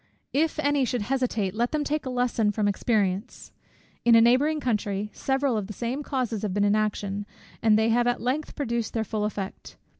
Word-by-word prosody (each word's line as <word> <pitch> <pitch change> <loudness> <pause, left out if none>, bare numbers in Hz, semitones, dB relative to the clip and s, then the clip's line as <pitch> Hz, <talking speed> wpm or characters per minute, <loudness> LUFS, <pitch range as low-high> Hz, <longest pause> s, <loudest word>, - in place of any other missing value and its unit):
If 315 +3 +1
any 290 -2 +2
should 245 -3 -1
hesitate, 235 -6 -1
let 235 +3 0
them 305 -1 0
take 295 -1 -2
a - - -2
lesson 245 -4 +1
from 210 0 0
experience. 205 0 -1 0.5
In 235 -1 +6
a 230 - +7
neighbouring 270 +7 +4
country, 210 -5 -1
several 270 -2 0
of 205 -3 -3
the 210 - -6
same 245 +6 -3
causes 250 -7 -2
have 200 -3 -2
been 205 - +2
in 205 0 +3
action; 205 -1 -1 0.3
and 220 -2 +5
they 220 +1 +2
have 240 +1 +3
at 245 - +1
length 265 +6 -2
produced 235 -6 -2
their 225 - +1
full 215 -1 -2
effect. 200 -2 -6
230 Hz, 200 wpm, -26 LUFS, 210-260 Hz, 0.5 s, a